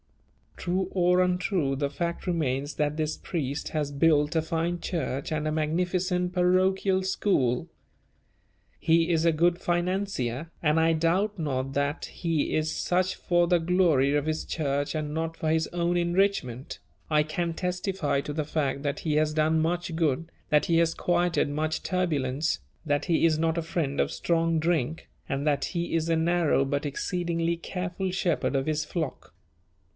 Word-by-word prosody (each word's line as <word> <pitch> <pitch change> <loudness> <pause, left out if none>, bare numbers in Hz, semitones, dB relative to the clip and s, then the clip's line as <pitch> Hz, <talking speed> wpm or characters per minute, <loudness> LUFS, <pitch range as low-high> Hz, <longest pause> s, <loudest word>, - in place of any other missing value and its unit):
True 185 +1 -1
or 180 0 +3
untrue, 180 -5 +1
the 140 +1 -1
fact 170 +5 -4
remains 145 -4 -1
that 150 0 0
this 155 -1 -1
priest 145 -4 -3
has 150 -2 -2
built 150 +1 +3
a 160 - +2
fine 165 +2 -1
church 150 -6 -3
and 155 0 -1
a - - 0
magnificent 180 +3 0
parochial 185 +1 +2
school. 185 - +1 1.1
He 165 +1 +3
is 165 -1 +2
a 165 - +5
good 170 +2 +2
financier, 175 -6 -1
and 155 0 +3
I 165 0 +4
doubt 180 +6 +1
not 135 -3 -2
that 140 +2 -1
he 165 -4 -1
is 155 0 0
such 185 +1 0
for 175 -1 +2
the 175 0 +3
glory 165 -5 +3
of 145 0 +1
his 155 0 -1
Church 145 -2 -1
and 150 -1 -3
not 165 0 -2
for 155 - -1
his 160 0 +1
own 175 0 0
enrichment; 175 -8 0 0.3
I 150 -1 +4
can 165 +2 -2
testify 180 -4 -1
to 145 - -5
the 155 0 -2
fact 140 -2 -1
that 145 -1 -2
he 155 -2 -1
has 155 0 +2
done 155 +1 +2
much 170 +1 -1
good, 160 0 0 0.2
that 150 -1 +3
he 165 - +2
has 165 -1 +3
quieted 175 -3 +1
much 155 +2 -1
turbulence, 155 -5 0 0.3
that 145 -1 0
he 165 -1 +2
is 160 -2 +3
not 165 +1 +1
a - - +1
friend 155 -4 -2
of - - +1
strong 165 -1 +1
drink, 160 -2 -1 0.2
and 140 0 -1
that 140 -2 +2
he 170 -2 -2
is 165 0 0
a 165 - +3
narrow 160 -3 +2
but 140 +2 -1
exceedingly 170 +2 -1
careful 180 +2 -3
shepherd 175 -6 0
of 135 0 +1
his 155 0 0
flock. 160 -5 -4
165 Hz, 170 wpm, -27 LUFS, 150-175 Hz, 1.1 s, a